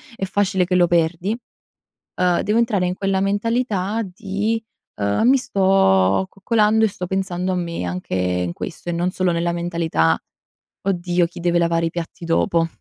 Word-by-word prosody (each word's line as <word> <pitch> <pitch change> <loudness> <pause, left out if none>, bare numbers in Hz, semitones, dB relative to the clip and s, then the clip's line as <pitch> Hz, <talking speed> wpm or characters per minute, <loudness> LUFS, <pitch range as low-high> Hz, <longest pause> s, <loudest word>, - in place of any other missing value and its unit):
è 195 - -3
facile 190 -1 +1
che 180 - -2
lo 175 -1 +5
perdi. 175 +6 +1 0.8
Uhm, 180 -1 +3
devo 210 +3 +1
entrare 215 -6 +1
in 180 - -1
quella 195 0 0
mentalità 205 +1 0
di, 205 +3 -2 0.4
uhm: 100 - +2
"Mi 265 - +6
sto 95 - +3
coccolando 215 +2 +2
e - - +3
sto 185 -2 -5
pensando 185 -1 -2
a - - 0
me 170 - -3
anche 90 +1 -4
in 90 -1 0
questo", 170 - -7
e - - 0
non 175 +2 0
solo 185 -1 0
nella 170 +1 0
mentalità: 170 - +1 0.7
"Oddio, 175 -2 +1
chi 175 - -11
deve 175 0 +1
lavare 170 -1 +1
i - - -2
piatti 170 0 -6
dopo". 165 0 +2
180 Hz, 170 wpm, -21 LUFS, 170-195 Hz, 0.8 s, Mi